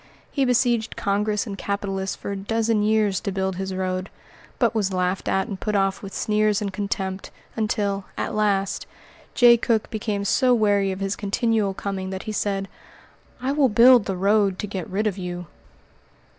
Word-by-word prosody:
He 275 -2 +1
besieged 240 -2 +1
Congress 210 +2 0
and 205 -4 -5
capitalists 195 -1 -2
for - - -6
a - - -2
dozen 220 +2 0
years 210 -2 +2
to 200 - -3
build 190 -1 -2
this 190 0 -3
road, 185 0 -2 0.5
but 235 -3 +2
was 205 -4 0
laughed 180 0 -1
at 190 +2 +1
and 200 -4 -6
put 210 +1 -2
off 195 0 +1
with 195 - -8
sneers 210 0 +1
and 200 -3 -4
contempt, 195 -1 -3 0.3
until, 205 -3 -1
at - - -2
last, 200 -2 0 0.5
Jay 240 -1 +7
Cooke 225 -1 0
became 210 -2 -2
so 250 +4 +3
weary 205 -3 +2
of 190 +1 -6
his 195 0 -1
continual 210 -1 0
coming 190 -1 -4
that 190 0 -5
he 215 - -4
said: 195 -2 -1 0.8
"I 265 - +1
will 280 -2 +3
build 235 +1 +6
the 190 -2 -2
road 200 0 +2
to - - -3
get 190 -4 -5
rid 205 +4 -1
of 200 -2 -1
you." 180 -1 -5
200 Hz, 180 wpm, -23 LUFS, 195-220 Hz, 0.8 s, Jay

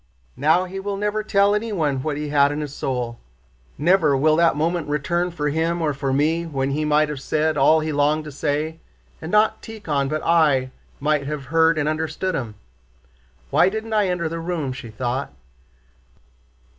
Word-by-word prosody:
"Now 160 +6 +3
he 190 +1 -6
will 200 0 -3
never 210 +1 -1
tell 200 -1 +3
anyone 185 - -1
what 150 0 -2
he 150 0 -4
had 145 -1 +4
in 150 +1 -3
his 145 -2 -5
soul. 120 -4 -3 0.6
Never 155 -2 +3
will 155 +3 +3
that 170 -2 +4
moment 165 +1 -1
return 170 +5 0
for 150 -4 -2
him 165 +3 0
or 155 -3 0
for 135 0 -2
me 155 +5 +1
when 135 -3 -2
he 150 +2 -1
might 150 0 +3
have 145 -3 -5
said 155 +2 0
all 155 +3 +4
he 155 0 -2
longed 150 +2 +2
to 150 - -8
say, 150 +3 -2 0.4
and 160 - -6
not 215 +1 +3
Tíkhon 155 -12 -3
but 155 +1 -2
I 145 -6 +3 0.3
might 150 -1 0
have 150 -2 -4
heard 165 0 +4
and 150 -1 0
understood 160 +4 -2
him. 115 -8 -4 1.0
Why 180 - +5
didn't 220 +2 -5
I 210 -2 +3
enter 180 -2 -1
the 165 +1 -4
room?" 165 -6 -3
she 130 -2 -9
thought. 125 - -3
155 Hz, 180 wpm, -22 LUFS, 145-170 Hz, 1.0 s, Why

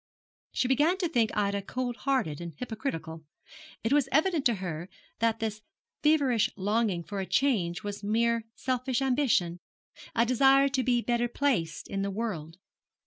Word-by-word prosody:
She 250 - 0
began 295 +8 +3
to 365 -2 0
think 235 -9 +2
Ida 200 -1 +1
cold 245 +4 -3
hearted 250 - -1
and 170 -1 -6
hypocritical. 215 - -5 0.6
It 225 +5 +1
was 285 -2 +3
evident 315 0 +2
to 235 - +1
her 175 -2 -5 0.3
that 225 -1 +1
this 215 -1 -3 0.4
feverish 280 -7 +3
longing 205 -2 0
for 195 +2 -4
change 210 -8 +1
was 205 0 -5
mere 230 +2 +1
selfish 255 -1 -1
ambition, 245 -11 +1 0.6
a 230 0 +4
desire 270 +3 +5
to 265 -1 0
be 245 -2 +2
better 240 0 +1
placed 240 - -1
in 195 0 -3
the 200 - -1
world. 190 -7 -4
230 Hz, 150 wpm, -29 LUFS, 195-265 Hz, 0.6 s, desire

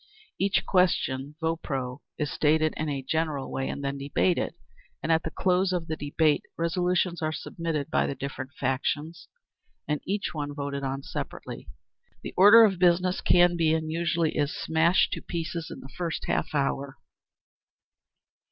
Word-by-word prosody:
_ - - -29 0.4
Each 195 0 +1
question 150 -6 +1
(vopros) 140 -6 -2 0.2
is 150 -1 -2
stated 155 +1 +2
in 155 0 -2
a 140 -2 -3
general 155 -1 -1
way 135 - -2
and 140 - -5
then 140 0 -2
debated, 145 +5 0 0.5
and 160 - 0
at 160 0 +4
the 160 - -4
close 185 +2 +1
of 175 -2 -1
the 160 - -3
debate 150 0 +1 0.2
resolutions 175 +1 0
are 155 0 0
submitted 160 -2 -4
by - - +2
the 140 - -3
different 135 0 -6
factions, 145 +5 -2 0.6
and 150 -1 -1
each 200 +2 -2
one 145 -2 -4
voted 140 -1 -3
on 135 +1 -3
separately. - - -6 0.6
The - - -6
Order 205 +4 +9
of 195 -4 0
Business 180 +1 +3
can 175 0 +5
be, 160 -2 +3
and 160 -1 -2
usually 165 -1 0
is, 145 0 +1
smashed 165 +3 +2
to - - -4
pieces 170 -1 -4
in - - -8
the 135 - -11
first 170 -2 -3
half - - -1
hour. 140 -1 -1
160 Hz, 160 wpm, -27 LUFS, 140-175 Hz, 0.6 s, Order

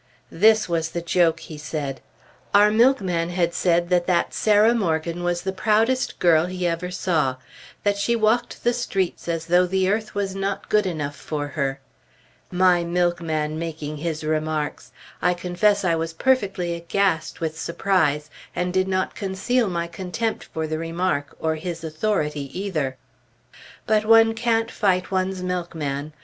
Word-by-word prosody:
This 215 +3 +4
was 165 -2 -1
the 170 - -4
joke, 170 -1 +2
he 155 -2 -9
said. 150 -3 -4 0.5
Our 205 +1 +6
milkman 200 -8 +2
had 175 -1 0
said 175 -1 +1
that 175 -1 +2
that 175 -2 +1
Sarah 215 +2 +4
Morgan 170 -5 -1
was 175 0 -1
the 190 - -1
proudest 220 +6 +1
girl 170 -1 +4
he 180 0 -3
ever 170 +1 -1
saw; 165 -8 0 0.5
that 205 -1 +1
she 235 +4 +1
walked 230 +2 +1
the 240 - +3
streets 195 -9 -2
as 165 -1 -2
though 180 +1 +3
the 190 +1 +1
earth 210 +2 -1
was 200 -1 -1
not 195 +1 -3
good 210 -2 +3
enough 150 -5 -3
for 145 -1 -4
her. 135 -3 -2 0.7
My 180 -1 +3
milkman 170 -3 -1
making 155 -2 -5
his 160 0 -3
remarks! 155 -1 -2 0.3
I 180 +1 +2
confess 185 +3 +1
I 170 - +3
was 165 0 -2
perfectly 195 -5 +1
aghast 170 -1 -1
with 160 -1 -3
surprise, 160 -4 0 0.2
and 180 +1 -1
did 185 0 +2
not 185 0 -1
conceal 205 +4 0
my 170 -1 -2
contempt 190 +6 -3
for 160 0 -4
the 155 0 -3
remark, 165 -3 -2
or 160 0 0
his 165 +1 -5
authority 155 -4 -1
either. 155 -10 -2 0.9
But 215 -1 +2
one 225 0 +6
can't 225 0 0
fight 185 -3 0
one's 185 0 -1
milkman! 155 -5 -3
175 Hz, 155 wpm, -23 LUFS, 160-200 Hz, 0.9 s, Our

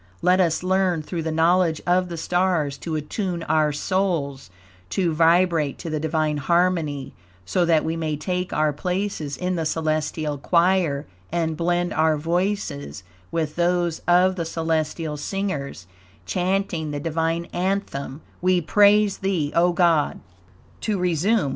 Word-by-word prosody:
Let 180 +1 +4
us 170 -1 +1
learn, 185 -3 +1
through 170 +2 -4
the 160 0 -2
knowledge 165 0 +3
of 180 +1 +2
the 170 - -5
stars, 175 -4 0
to 165 -2 -4
attune 170 +3 -3
our 155 -1 +2
souls 150 - -1 0.4
to 175 -4 0
vibrate 165 -2 +3
to 165 - -6
the 155 - -1
Divine 155 -1 0
harmony, 160 -2 0 0.3
so 175 - +1
that 165 -2 +3
we 160 - -1
may 155 -2 -2
take 180 +4 -3
our 155 -1 +1
places 180 -2 -3
in 180 0 -2
the 165 - -1
celestial 155 -1 -1
choir 170 -3 +2 0.3
and 165 -1 -1
blend 175 +1 0
our 155 -1 +2
voices 160 - -2 0.3
with 160 -3 -2
those 175 -1 +1
of 180 +2 +4
the 170 - -2
celestial 160 -1 -2
singers, 145 - -4 0.4
chanting 180 -4 -1
the 145 -1 -3
Divine 165 +2 -1
anthem: 175 -7 -2 0.2
"We 185 0 +3
Praise 205 +3 +4
Thee, 180 -7 -1
O 175 +1 +4
God!" 170 -4 +2 0.6
To 215 -2 -1
resume. 180 0 +1
165 Hz, 140 wpm, -23 LUFS, 155-180 Hz, 0.6 s, Let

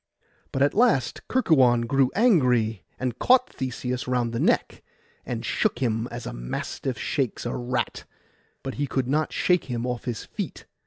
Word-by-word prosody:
But 135 - +1
at 145 - +3
last 220 - +2
Kerkuon 130 - +4
grew 135 +1 +3
angry, 125 - +3 0.2
and 125 -2 -3
caught 255 0 +4
Theseus 125 -1 -3
round 120 -2 0
the 115 - -1
neck, - - +1 0.5
and - - -3
shook - - 0
him 115 -2 0
as 120 0 -7
a - - -5
mastiff 60 - -4
shakes 130 +1 -2
a 120 - -2
rat; 125 0 -2 0.6
but 135 - -4
he 145 - +1
could 130 -1 -1
not 155 +4 +1
shake 180 -1 +2
him 120 -2 -3
off 125 -2 -3
his 120 -4 -4
feet. - - -6
125 Hz, 165 wpm, -25 LUFS, 120-140 Hz, 0.6 s, Kerkuon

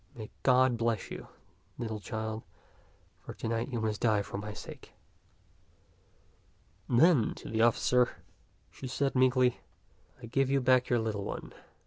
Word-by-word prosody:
May 110 -3 -8
God 130 -1 +4
bless 115 -3 -1
you, - - -7 0.5
little 110 -3 -4
child, 110 +2 -4 0.8
for - - -10
to - - -5
night 115 0 -1
you 120 - -2
must 110 -1 -2
die 110 -3 +3
for 100 - -6
my 105 +1 -5
sake." 105 - -10 2.0
Then 130 -1 +4
to - - -10
the 110 0 0
officer 120 +2 +3 0.6
she 130 - -8
said 135 +2 -1
meekly, 130 -1 +3 0.3
" - - -34
I - - -9
give 135 +3 +1
you 140 0 +3
back 130 -1 +3
your 120 - +3
little 110 -3 -2
one. - - -6
120 Hz, 150 wpm, -30 LUFS, 110-130 Hz, 2.0 s, God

